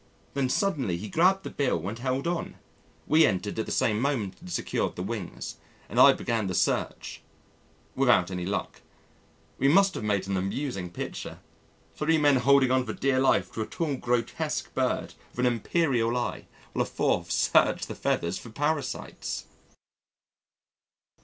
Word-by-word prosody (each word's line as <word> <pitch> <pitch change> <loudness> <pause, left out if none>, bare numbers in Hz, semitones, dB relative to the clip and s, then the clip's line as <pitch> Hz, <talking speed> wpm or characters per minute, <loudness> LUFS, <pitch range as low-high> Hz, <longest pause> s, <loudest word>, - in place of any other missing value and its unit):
Then 135 -2 0
suddenly 135 - 0
he 105 - -6
grabbed 185 - +3
the - - -6
bill 100 - -1
and 110 +4 -5
held 130 +2 -1
on. 170 0 -2 0.5
We 160 +1 +5
entered 105 - 0
at 110 - -2
the - - -4
same 105 -2 +1
moment 125 -9 0
and 180 +1 -10
secured - - -1
the 90 - -4
wings, 100 -3 -5 0.3
and - - -2
I - - +10
began 115 -4 -1
the 90 - -2
search - - -1 0.7
without 120 -9 +3
any 90 -1 -3
luck. 100 - -3 0.8
We 135 - +3
must 195 +6 +5
have - - -5
made 100 -3 0
an 95 -1 0
amusing 95 0 -3
picture 85 - -6 0.6
three 160 +1 +2
men 145 -3 +4
holding 135 0 +4
on 130 0 +3
for 110 -3 -5
dear 135 +2 +1
life 130 - +2
to 110 - -3
a 110 - -3
tall, 155 -4 -2
grotesque 120 -2 -2
bird - - -1 0.2
with 125 - +1
an 125 - +3
imperial 120 -2 +1
eye, 120 - -3 0.3
while - - 0
a - - +2
fourth - - 0
searched - - +3
the - - -5
feathers 85 +2 -1
for - - -11
parasites! 145 +2 -3
125 Hz, 165 wpm, -27 LUFS, 105-145 Hz, 0.8 s, I